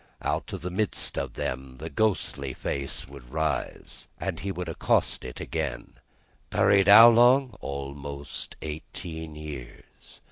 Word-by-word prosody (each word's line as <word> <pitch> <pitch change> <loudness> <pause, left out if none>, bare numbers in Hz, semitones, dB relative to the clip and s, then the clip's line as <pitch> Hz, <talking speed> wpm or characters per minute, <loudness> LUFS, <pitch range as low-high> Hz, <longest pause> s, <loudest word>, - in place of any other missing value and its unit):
Out - - -1
of - - -5
the 90 - -3
midst 105 +3 -1
of 70 -3 -3
them, 65 0 -4
the 80 +4 -7
ghostly 90 - 0
face 70 0 -4
would 65 -3 -13
rise, 80 -2 -3
and - - -3
he 100 +2 -3
would 90 -1 -4
accost 80 - +1
it 65 - -7
again. - - -4 0.5
"Buried 100 -1 +4
how 110 +3 +11
long?" 120 +1 +5
"Almost 70 +1 -6
eighteen 80 +1 -6
years." 75 -5 -10
80 Hz, 135 wpm, -27 LUFS, 70-100 Hz, 0.5 s, how